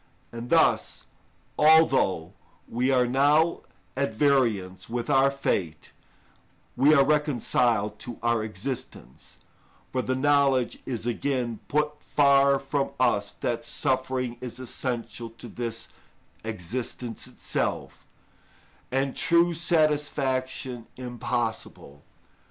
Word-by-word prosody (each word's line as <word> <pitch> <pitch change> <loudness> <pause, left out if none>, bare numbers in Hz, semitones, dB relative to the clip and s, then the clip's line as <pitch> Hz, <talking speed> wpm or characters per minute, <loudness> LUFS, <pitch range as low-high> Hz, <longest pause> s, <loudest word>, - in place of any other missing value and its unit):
And 115 +1 -7
thus, 165 -1 +2 0.5
although 135 - +4 0.3
we 125 +3 0
are 130 -2 +4
now 145 +6 +3 0.3
at 130 -4 -1
variance 110 -9 +1
with 120 0 -2
our 135 +1 +5
fate, 95 - -2 0.8
we 140 +4 +5
are 140 -1 +5
reconciled 120 -7 +1
to 120 -2 -7
our 115 -2 +1
existence, 100 - -7 0.5
for 130 - 0
the 130 +1 -1
knowledge 140 -2 +2
is 120 -3 -3
again 120 -2 -1
put 150 0 -1
far 140 0 +4
from 135 +1 -2
us 105 -5 +2
that 115 -1 -3
suffering 130 -2 -1
is 125 -2 -6
essential 125 -2 -4
to 120 - -9
this 115 -1 -5 0.5
existence 110 +3 -5
itself, - - -3 0.9
and 135 +1 0
true 170 +1 +3
satisfaction 145 -7 0
impossible. 120 - -4
130 Hz, 100 wpm, -26 LUFS, 115-140 Hz, 0.9 s, our